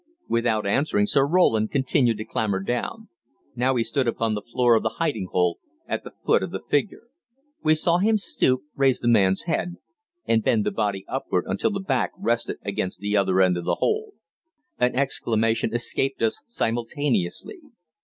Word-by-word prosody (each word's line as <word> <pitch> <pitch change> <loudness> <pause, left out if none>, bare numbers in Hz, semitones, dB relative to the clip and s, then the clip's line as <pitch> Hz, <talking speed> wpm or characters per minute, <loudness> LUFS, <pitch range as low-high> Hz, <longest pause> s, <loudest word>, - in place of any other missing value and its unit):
Without 115 -2 +1
answering 105 0 +2
Sir 135 +6 +2
Roland 115 -11 +3
continued 130 -4 +2
to 110 - -5
clamber 110 -4 -1
down. 125 - -3 0.5
Now 130 +2 +1
he 120 - +2
stood 125 +3 -1
upon 115 -1 0
the 105 - -3
floor 120 +1 +2
of 110 - +4
the - - -2
hiding 145 - -1
hole, 90 -1 +1 0.3
at - - -3
the - - -10
foot - - +4
of - - -3
the - - -6
figure. - - 0 0.6
We 155 -1 +4
saw 170 +2 +2
him 215 +3 +3
stoop, 130 -9 0
raise 135 -2 +2
the 120 - -3
man's 95 -5 +3
head, 175 +1 -2 0.5
and 110 -1 +2
bend 110 -3 +2
the - - 0
body 100 -3 -2
upward - - -2
until 95 - 0
the 200 -2 -3
back 190 - -1
rested 120 -11 -1
against 100 -2 -3
the 105 +1 -1
other 95 -2 +3
end 90 -1 +3
of 85 - -5
the - - +1
hole. 440 -1 -1 0.7
An 125 0 +2
exclamation 115 -4 0
escaped 120 +2 0
us 110 - 0
simultaneously. 120 - -1
120 Hz, 175 wpm, -24 LUFS, 105-140 Hz, 0.7 s, of